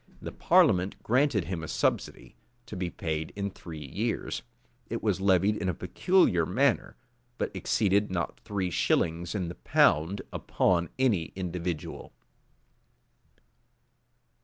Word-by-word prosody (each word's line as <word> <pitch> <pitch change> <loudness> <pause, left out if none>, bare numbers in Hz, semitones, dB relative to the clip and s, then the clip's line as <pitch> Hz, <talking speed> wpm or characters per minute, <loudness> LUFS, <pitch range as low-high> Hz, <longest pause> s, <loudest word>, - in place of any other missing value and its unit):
The - - -6
parliament 90 +2 +3
granted 125 - +2
him 85 0 -4
a 80 - -6
subsidy, - - -2 0.3
to - - -8
be 90 -1 -2
paid 80 -2 -3
in 100 0 -3
three 80 -5 -9
years; 65 - -3 0.5
it - - -4
was - - 0
levied 95 +2 +3
in 95 -3 -2
a 90 - -1
peculiar 90 - +2
manner; 125 - +1 0.4
but - - -3
exceeded 100 -1 +1
not 85 -2 -3
three 95 -3 -3
shillings 85 +3 0
in 90 -4 -1
the 85 - -5
pound 90 +3 +2
upon 85 -3 +1
any 115 -11 +2
individual. 90 -3 -4
90 Hz, 125 wpm, -28 LUFS, 85-100 Hz, 0.5 s, parliament